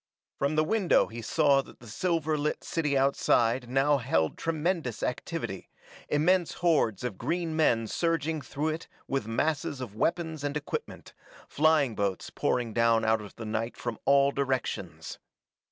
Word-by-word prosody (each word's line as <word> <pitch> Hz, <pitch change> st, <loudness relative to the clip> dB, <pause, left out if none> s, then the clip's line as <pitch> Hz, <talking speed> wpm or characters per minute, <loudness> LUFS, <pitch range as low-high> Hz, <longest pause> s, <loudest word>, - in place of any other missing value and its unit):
From 140 Hz, +2 st, +1 dB
the 155 Hz, -, +3 dB
window 195 Hz, +1 st, +3 dB
he 115 Hz, +1 st, -8 dB
saw 140 Hz, +2 st, +3 dB
that -, -, -16 dB
the 120 Hz, -, -14 dB
silver 160 Hz, +5 st, 0 dB
lit 150 Hz, 0 st, -2 dB
city 150 Hz, -4 st, 0 dB
outside 125 Hz, -2 st, +2 dB
now 135 Hz, +3 st, +3 dB
held 80 Hz, -9 st, 0 dB
tremendous 165 Hz, -, -2 dB
activity, -, -, -4 dB, 0.4 s
immense 175 Hz, +4 st, +2 dB
hordes 150 Hz, -, +1 dB
of 120 Hz, -6 st, -4 dB
green 170 Hz, -2 st, -2 dB
men 120 Hz, -8 st, +3 dB
surging 160 Hz, +3 st, -1 dB
through 150 Hz, +3 st, -2 dB
it 160 Hz, +1 st, -4 dB, 0.2 s
with 135 Hz, -6 st, -2 dB
masses 145 Hz, +4 st, -1 dB
of 125 Hz, -6 st, -6 dB
weapons 160 Hz, +3 st, -1 dB
and 145 Hz, 0 st, -1 dB
equipment, 150 Hz, -, -6 dB, 0.3 s
flying 150 Hz, -5 st, +3 dB
boats 100 Hz, -3 st, -2 dB
pouring 120 Hz, -3 st, -1 dB
down 115 Hz, -1 st, +3 dB
out 110 Hz, 0 st, +2 dB
of 105 Hz, -, -11 dB
the 115 Hz, -, -7 dB
night 110 Hz, +2 st, -3 dB
from 120 Hz, -3 st, -4 dB
all 140 Hz, 0 st, +5 dB
directions. 120 Hz, -, -3 dB
140 Hz, 155 wpm, -28 LUFS, 115-160 Hz, 0.4 s, all